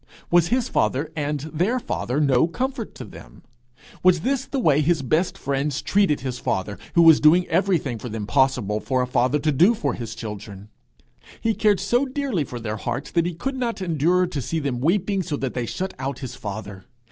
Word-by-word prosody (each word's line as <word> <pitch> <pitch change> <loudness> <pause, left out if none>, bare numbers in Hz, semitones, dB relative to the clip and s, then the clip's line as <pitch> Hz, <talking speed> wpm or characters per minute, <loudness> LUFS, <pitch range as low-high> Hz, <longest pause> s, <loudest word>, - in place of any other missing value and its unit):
Was 175 -1 +5
his 245 +4 +1
father 150 - 0
and 150 -2 -2
their 175 - -1
father 125 - -2
no 140 0 +3
comfort 250 +6 -4
to 125 - -8
them? - - -14 0.6
Was 180 -2 +4
this 265 +4 0
the 275 - -4
way 155 - +3
his 155 -1 +1
best 155 +8 0
friends 140 +1 -1
treated 195 -9 +2
his 125 -2 -4
father, 100 +2 -2 0.2
who 170 - +6
was 160 -2 +8
doing 165 +4 +5
everything 165 - +1
for 125 - -6
them 110 -1 -4
possible 130 -5 +1
for 130 +2 0
a - - 0
father 125 +2 +1
to 150 +1 0
do 175 - +4
for 140 - -1
his 115 -1 -6
children! 105 -2 -8 0.7
He 225 - +1
cared 210 -2 +2
so 240 +8 +1
dearly 260 - -1
for 125 -3 -7
their 110 -1 -4
hearts 120 +5 -4
that 170 0 +1
he 175 - -4
could 265 +10 -3
not 240 -4 -2
endure 175 +1 +2
to 160 -6 -4
see 165 +7 -3
them 140 -5 -2
weeping 190 +7 +1
so 150 -4 -3
that 135 -3 -3
they 120 -2 -3
shut 190 +8 -4
out 135 0 -3
his 130 -3 -7
father. 100 -2 -7
150 Hz, 205 wpm, -23 LUFS, 125-185 Hz, 0.7 s, was